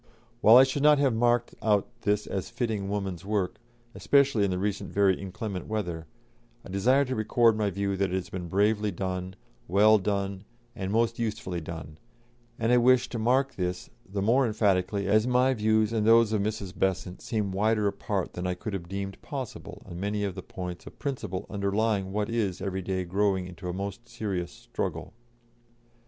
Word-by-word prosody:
While 110 +3 +8
I 130 - +9
should 135 +1 -1
not 150 0 +6
have 140 -3 +2
marked 120 +1 +2
out 105 -2 +2
this 105 0 +1
as 95 -2 -4
fitting 115 -5 -2
woman's 95 -4 -3
work, 100 -2 -1 0.4
especially 140 -7 +3
in 100 - +2
the 90 - -1
recent 100 +1 -2
very 100 -1 +4
inclement 100 -1 -5
weather, 90 -7 -3 0.6
I - - -10
desire 125 +9 +3
to 130 0 -3
record 115 +1 +3
my 105 -2 0
view 100 +1 -1
that 95 0 0
it 90 - -2
has 95 -1 -4
been 90 -2 -5
bravely 105 +3 +2
done, 95 0 -4 0.3
well 105 +4 +5
done, 100 0 -2 0.3
and 95 0 -3
most 115 +1 +1
usefully 100 -6 -3
done, 80 -1 -8 0.6
and 115 +1 +1
I 125 - +6
wish 125 +1 +4
to 120 - -4
mark 130 +4 +2
this 90 -1 -4 0.2
the 100 0 -2
more 125 +5 +3
emphatically 100 -2 +1
as 105 +4 +3
my 125 +1 +3
views 110 -1 +2
and 110 -2 +1
those 115 0 +5
of 105 - +1
Mrs. 105 -3 -3
Besant 95 -1 -1
seem 105 -3 -2
wider 105 +2 +1
apart 100 -1 -2
than 90 +1 -3
I 90 - -1
could 105 +4 -6
have 85 -3 -5
deemed 95 0 -5
possible 135 -5 -7
on 85 -2 -8
many 105 +1 -1
of 100 -2 -2
the 95 - -7
points 90 -1 -7
of - - -11
principle 125 - -4
underlying 100 -1 0
what 105 +1 -1
is 110 -6 -1
every 95 -1 -3
day 95 0 -2
growing 95 +1 0
into 90 0 -7
a - - -1
most 100 +5 -6
serious 100 -7 -3
struggle." - - -5
100 Hz, 185 wpm, -28 LUFS, 95-110 Hz, 0.6 s, I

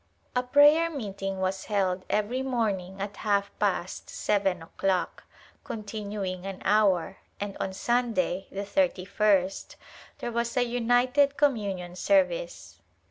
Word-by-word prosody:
A 250 - +3
prayer 290 +6 +5
meeting 195 -9 -4
was 190 0 -1
held 190 -3 0
every 215 +5 0
morning 205 -8 -2
at 200 +1 -5
half 200 -2 0
past - - -1
seven 195 -4 0
o'clock, 185 +1 -2 0.4
continuing 205 -4 -5
an 195 -1 -6
hour, 195 -3 +3 0.2
and 200 -1 -4
on 190 - -2
Sunday, 235 -2 0
the 200 +1 -4
thirty 200 -3 +1
first, 195 -2 +1 0.4
there 240 - -4
was 235 +1 -2
a 245 - +3
united 245 +4 +2
communion 200 -10 0
service. 300 - 0
205 Hz, 125 wpm, -27 LUFS, 190-245 Hz, 0.4 s, prayer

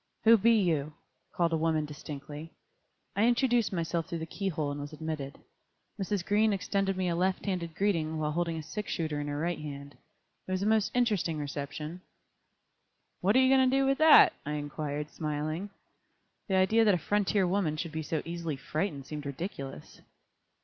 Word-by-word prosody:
"Who 230 +1 +8
be 230 +2 +4
you?" 155 -6 0 0.4
called 170 -1 +1
a - - +3
woman, 160 -1 +1
distinctly. 150 +1 -8 0.6
I 210 - +3
introduced 240 -1 +3
myself 170 -2 -2
through 170 -2 -3
the 160 - -4
key 195 +4 -4
hole 150 -4 -2
and 145 0 -5
was 145 +2 -7
admitted. 155 -2 -5 0.6
Mrs. 195 -2 -1
Green 210 +1 +3
extended 195 0 -1
me 185 -1 0
a 170 - 0
left 185 +2 0
handed 175 -5 -3
greeting 165 -5 0
while 150 -1 -1
holding 165 0 -1
a 160 - -5
sixshooter 160 -3 -3
in 145 - -4
her 145 0 -3
right 170 +3 -1
hand. 140 -1 -8 0.5
It - - -5
was 185 +1 0
a - - 0
most 220 -1 +3
interesting 210 -10 +1
reception. 150 +3 -5 1.2
"What 200 +5 +2
are - - +7
you 260 +1 +5
going 260 -1 +5
to 265 - +2
do 275 - +3
with 270 0 +1
that?" 315 0 +8
I 150 - -3
inquired, 150 0 -4
smiling. 155 +5 -3 0.8
The 190 - +1
idea 190 +5 +4
that 205 -4 +5
a 170 - -6
frontier 205 -1 +2
woman 175 -5 0
should 165 +1 -4
be 160 0 -3
so 155 0 -2
easily 165 -2 -3
frightened 150 0 -3
seemed 150 0 -6
ridiculous. 140 -2 -7
165 Hz, 185 wpm, -30 LUFS, 150-200 Hz, 1.2 s, Who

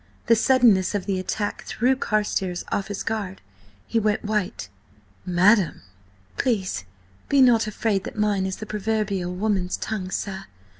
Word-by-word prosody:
The 230 - +5
suddenness 220 -5 +4
of 200 - -2
the 195 -2 -1
attack 205 +3 -3
threw 255 +3 +1
Carstares 205 -7 -1
off 195 - -1
his 205 -1 -4
guard. 205 -4 -3 0.5
He 230 - 0
went 215 0 0
white. 210 - -2 0.6
"Madam!" 185 +1 +3 0.5
"Please 195 - -1 0.4
be 280 - +4
not 235 -4 +5
afraid 210 -2 0
that - - -7
mine 205 -3 +1
is 190 - -3
the 215 - -7
proverbial 210 -3 -1
woman's 190 -2 0
tongue, 200 -4 -4
sir. 190 0 -4
205 Hz, 145 wpm, -24 LUFS, 190-220 Hz, 0.6 s, The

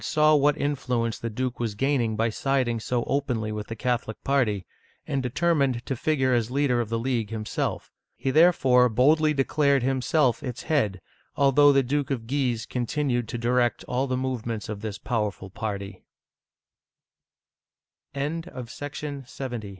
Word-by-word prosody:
saw 155 0 +3
what 145 0 +4
influence 125 -6 -1
the 115 - -3
duke 125 +3 -3
was 115 -3 -2
gaining 125 -2 +1
by 115 +2 +1
siding 125 0 0
so 120 +2 -1
openly 125 -6 -1
with 105 0 -5
the 115 - -5
Catholic 115 -1 -2
party, 120 -9 +1 0.4
and 140 -2 -1
determined 135 -2 +1
to 135 - -2
figure 130 -1 +1
as 120 -2 +1
leader 130 -2 +1
of 115 - -4
the 115 - 0
League 115 -3 -1
himself. 110 -1 -3 0.2
He 135 - -2
therefore 130 -6 +5
boldly 150 +7 +4
declared 140 -1 +2
him 130 0 0
self 130 -3 +2
its 125 -2 -5
head, 105 - 0 0.3
although 145 +1 +5
the 135 -1 +3
Duke 140 +3 -1
of 125 -5 -2
Guise 125 -3 -1
continued 125 -1 -1
to 120 - -4
direct 120 +1 +1
all 130 +2 -1
the 130 -1 -1
movements 120 -4 -3
o 105 - -5
125 Hz, 135 wpm, -26 LUFS, 115-140 Hz, 0.4 s, therefore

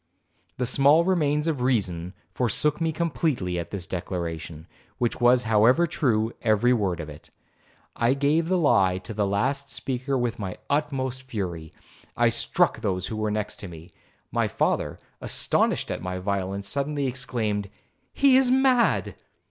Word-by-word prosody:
The 125 - 0
small 140 +6 +4
remains 150 -4 +1
of 150 -6 -1
reason 95 -8 -1 0.2
forsook 145 +6 0
me 165 -1 +1
completely 150 - -1
at 85 - -5
this 95 -4 -5
declaration, 85 -3 -5 0.3
which 120 0 -1
was 120 +1 +5
however 115 +9 +4
true 115 -9 0
every 115 +2 +3
word 95 -7 0
of 80 - -5
it. 75 -1 -12 0.7
I 120 +3 +2
gave 150 +4 +1
the 185 +1 +2
lie 95 - +3
to 95 +4 -7
the 105 -1 0
last 135 +8 -1
speaker 130 +1 -2
with 120 -2 -1
the 95 -4 -5
utmost 135 -3 -1
fury,—I 90 -10 -4
struck - - +1
those 95 -4 -1
who 110 - -4
were 110 0 -1
next 105 0 -3
me. 85 +1 -12 0.4
My - - +1
father, - - -1 0.2
astonished - - 0
at - - -4
my 90 0 -4
violence, 100 +1 -3
suddenly 140 +3 -1
exclaimed, 115 -6 -2 0.4
'He 275 -2 +5
is 265 -1 +3
mad.' 260 -2 +3
120 Hz, 150 wpm, -25 LUFS, 95-140 Hz, 0.7 s, was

